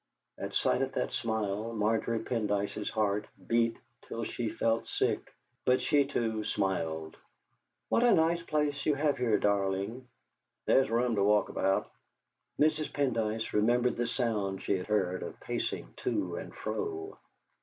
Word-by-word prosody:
At - - -5
sight - - +2
of - - -1
that 60 0 -1
smile 110 0 -1
Margery 110 +1 +1
Pendyce's 105 -3 -1
heart 105 -1 0 0.2
beat 115 +1 +2 0.3
till 115 - -4
she 115 0 -2
felt 115 +1 0
sick, - - -1 0.3
but 125 0 +4
she, 140 +2 +3
too, 115 -5 -1
smiled. 80 -7 -1 0.7
"What - - +2
a 240 - +6
nice 170 0 +3
place 150 -3 0
you 150 - +4
have 145 -1 +1
here, 120 -4 +3
darling!" 100 +4 0 0.6
"There's 135 - +4
room 120 +1 +2
to 100 - +3
walk 105 +1 +4
about." 95 0 0 0.7
Mrs. 155 0 +2
Pendyce 115 -5 0
remembered 120 +4 +3
the 120 0 -1
sound 105 -6 -1
she 100 - +1
had 90 - -4
heard 95 -4 +1
of - - -7
pacing - - -3
to - - -1
and - - -6
fro. 400 -1 -4
115 Hz, 145 wpm, -31 LUFS, 105-130 Hz, 0.7 s, a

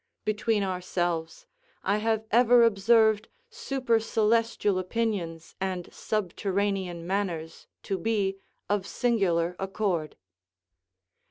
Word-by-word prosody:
Between 215 0 +1
ourselves, 175 -3 -2 0.4
I 200 +2 +2
have 220 0 0
ever 240 +1 +6
observed 220 0 +4 0.2
supercelestial 230 - +1
opinions 185 -5 -3
and 185 -2 -3
subterranean 195 -3 -2
manners 175 -4 -3 0.2
to 195 -1 -2
be 195 -1 0 0.3
of 205 -2 0
singular 180 -8 +1
accord. 190 -5 -2
200 Hz, 85 wpm, -27 LUFS, 180-225 Hz, 0.4 s, ever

